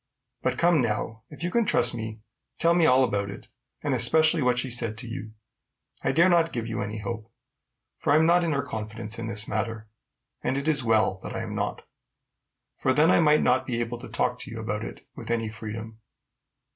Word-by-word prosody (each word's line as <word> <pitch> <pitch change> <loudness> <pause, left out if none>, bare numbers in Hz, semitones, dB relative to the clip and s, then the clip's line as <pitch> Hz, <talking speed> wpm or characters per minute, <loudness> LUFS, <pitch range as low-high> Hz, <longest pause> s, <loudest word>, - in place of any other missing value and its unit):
But 130 0 0
come, 170 -2 +4
now, 110 0 -2
if 150 +2 -9
you 175 - -1
can 235 +3 +3
trust 120 - +4
me, 110 -2 -6 0.4
tell 170 0 +3
me 170 -2 +4
all 130 +1 +5
about 100 -5 0
it, 100 - -10 0.3
and - - 0
especially 160 0 +3
what 125 -1 +2
she 125 - 0
said 115 -2 -1
to 120 +2 -6
you. 115 -2 -7 0.7
I - - +2
dare 170 +3 +5
not 170 -2 +3
give 115 -2 -3
you 115 -1 -3
any 105 +2 -4
hope, 115 0 -6 0.7
for 145 - 0
I - - +6
am 160 +1 +5
not 175 +1 +4
in 165 - 0
her 140 -1 0
confidence 110 -2 -5
in 115 - -4
this 110 -1 -1
matter; 110 0 -3 0.6
and 130 +2 0
it 140 +2 -3
is 150 -4 +2
well 110 -4 +2
that - - -6
I - - -2
am - - -5
not, - - -3 0.9
for 130 - +2
then 150 +4 +4
I - - +5
might 150 -2 +4
not 130 +1 +2
be 120 -3 -1
able 120 0 -3
to - - -9
talk - - -1
to - - -8
you - - -7
about - - -3
it - - -8
with - - -9
any 115 -2 0
freedom. 110 0 -7
120 Hz, 220 wpm, -26 LUFS, 110-150 Hz, 0.9 s, I